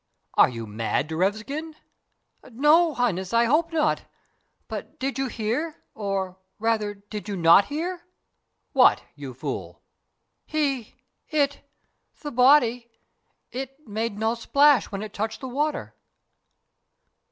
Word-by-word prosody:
"Are - - +6
you 115 -2 -6
mad, 110 +7 -1
Derevskin?" 215 - -2 0.7
"No, 300 +6 +4
Highness, 190 -6 -1
I 235 0 +4
hope 320 +7 +2
not: 310 -2 +1 0.6
but - - -7
did 265 0 -2
you 270 - 0
hear 250 +9 -3
or, 195 -3 -3 0.2
rather, 215 -2 0
did 205 +1 -8
you 200 - -3
not 170 +3 +6
hear?" 345 +4 -4 0.7
"What, - - +5
you 140 -4 -8
fool?" 130 - -6 0.6
"He 275 -7 -1 0.3
it 285 -3 +1 0.6
the 295 - -6
body 250 -2 +4 0.6
it 270 +2 -7
made 220 0 -3
no 220 +1 +1
splash 280 +2 +4
when 200 +1 -4
it 215 - -8
touched 220 +2 -3
the 260 - -6
water!" 290 +3 -2
235 Hz, 120 wpm, -25 LUFS, 205-290 Hz, 0.7 s, Are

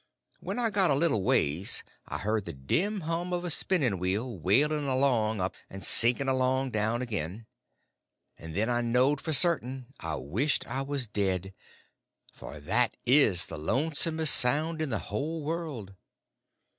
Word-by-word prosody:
When - - -5
I 235 -2 0
got 195 -3 +2
a 140 - +3
little 140 - +1
ways 85 0 +1 0.2
I - - -4
heard 105 0 -2
the - - -6
dim 185 - -1
hum 165 +2 -3
of 175 0 -2
a 175 - 0
spinning 140 - 0
wheel 105 +7 -2
wailing 145 - +1
along 125 -5 +1
up 95 +1 -2 0.2
and 95 0 -6
sinking 120 +4 +5
along 130 0 0
down 110 +3 -1
again; 105 -2 -5 0.9
and 80 -1 -10
then 105 +3 0
I 120 -1 0
knowed 125 +5 +1
for 160 - -4
certain 135 -6 +2
I 80 -1 -4
wished 100 - -1
I 135 - -4
was 140 -2 -2
dead—for 95 -6 -7
that 110 +10 0
is 120 -9 +4
the - - -8
lonesomest 155 - +3
sound 155 +6 +2
in 155 - -2
the 110 - -1
whole 160 +2 -4
world. 150 - -5
125 Hz, 155 wpm, -28 LUFS, 100-150 Hz, 0.9 s, sinking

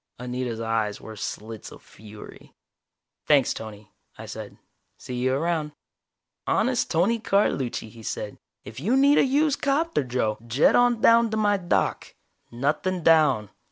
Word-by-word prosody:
Anita's 125 -1 -4
eyes 110 -2 -1
were 110 - -10
slits 110 +1 -7
of - - -14
fury. 105 0 -14 0.7
"Thanks, 140 -4 +4
Tony," 105 -1 -10 0.3
I - - -9
said. - - -9 0.4
"See 125 - -9
you 130 +1 0
around." 155 0 -1 0.7
"Honest 245 +2 +1
Tony 195 +8 +1
Carlucci," 170 - 0
he 115 +1 -14
said. 105 -1 -5 0.3
"If 110 +4 -9
you 220 - +1
need 280 +2 +5
a - - +5
used 285 +2 +1
'copter, 295 - +1
Joe, 120 -4 -2
jet 125 +6 +3
on 245 -2 +3
down 230 0 +5
to 220 - -2
my 205 -1 +2
dock. 175 -2 -1 0.3
Nothing 150 +8 -2
down. 150 -11 +3
145 Hz, 145 wpm, -25 LUFS, -, 0.7 s, need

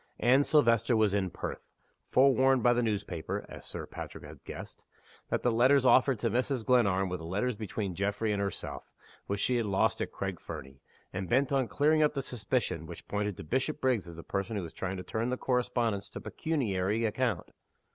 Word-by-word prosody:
Anne 130 +4 +5
Silvester 115 -5 +3
was 110 -2 +3
in 95 -2 +1
Perth; - - -5 0.5
forewarned 130 -1 +4
by 120 - +6
the 120 - +1
newspaper 100 -7 -2
(as - - -10
Sir - - -6
Patrick - - -8
had - - -12
guessed) - - -8 0.5
that - - -1
the 125 - +3
letters 130 +4 +4
offered 130 0 +5
to 115 +2 0
Mrs. 125 0 0
Glenarm 100 -7 +3
were 90 0 -3
the 80 - -10
letters 100 +9 -1
between 105 -2 -4
Geoffrey 100 +4 -1
and 100 - -1
herself, 100 -3 -5 0.4
which 100 0 -2
she 125 - +2
had 115 -3 0
lost 100 -1 +1
at - - -2
Craig 95 -3 -4
Fernie, 65 0 -9 0.3
and 95 -1 -4
bent 130 +5 +2
on 135 -3 +2
clearing 155 +4 +3
up 150 0 +3
the 135 - -1
suspicion 105 - -2
which 85 - -10
pointed 105 -2 -2
to - - -7
Bishopriggs 130 - 0
as 85 - -9
the 85 - -9
person 100 +3 -3
who 100 - -2
was 80 - -8
trying 95 0 -3
to 90 - -6
turn 115 +5 -2
the 125 - -1
correspondence 120 -5 0
to - - -7
pecuniary 110 - -1
account. 110 -4 -1
115 Hz, 195 wpm, -30 LUFS, 95-125 Hz, 0.5 s, by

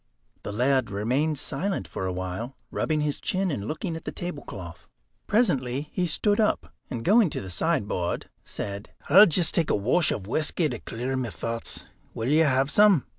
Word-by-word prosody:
The - - -5
laird 125 +2 +2
remained 130 +10 0
silent 195 +7 -2
for 95 - -4
a - - -1
while, 95 +8 -4 0.2
rubbing 155 -1 0
his 150 -1 -1
chin, 190 -1 0
and 105 -7 -3
looking 165 - -3
at 160 - -7
the - - -4
tablecloth. 100 - -7 0.4
Presently 145 - +1
he 180 -1 0
stood 205 +6 +1
up, 215 - +1 0.2
and 120 -3 -5
going 210 0 +5
to - - -3
the 95 - -6
sideboard, 105 - -1 0.2
said: 100 0 -6 0.2
"I'll 200 +6 +10
just 170 0 +3
take 165 -3 +1
a - - +3
wash 125 - +2
of 95 - -3
whisky 155 - +1
to 120 -4 -5
clear 125 +3 -4
my 130 -3 -2
thoughts. 115 +2 -4 0.3
Will 115 +3 -2
you 155 +2 +5
have 135 0 +2
some?" 205 -8 +5
140 Hz, 180 wpm, -26 LUFS, 115-170 Hz, 0.4 s, I'll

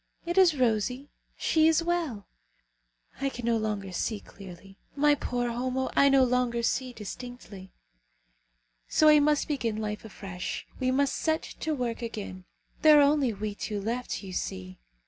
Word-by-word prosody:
It 345 0 -2
is 360 -6 +5
rosy. 250 +3 0 0.3
She 315 -1 +3
is 325 +1 +3
well! 330 - -2 0.9
I 275 0 0
can 245 -3 -7
no 235 0 +2
longer 210 -3 -3
see 205 +4 -2
clearly. 195 0 -13 0.2
My 295 +1 +4
poor 245 -4 -2
Homo, 255 +2 -2
I 280 - +6
no 270 -1 +5
longer 245 -1 +1
see 255 +2 0
distinctly. 215 -4 -9 1.2
So 310 - +2
we 305 -1 +8
must 295 0 +2
begin 235 -7 -1
life 210 -1 -4
afresh. 195 -4 -6
We 255 -1 +1
must 275 +1 +1
set 315 0 0 0.2
to 315 -1 -1
work 245 -3 -3
again. 205 -5 -6 0.4
There 305 -1 +8
are 290 - +7
only 285 -3 +3
we 210 0 -4
two 205 0 -4
left, 230 +2 -3
you 190 -1 -8
see. 95 - -5
245 Hz, 160 wpm, -28 LUFS, 210-280 Hz, 1.2 s, we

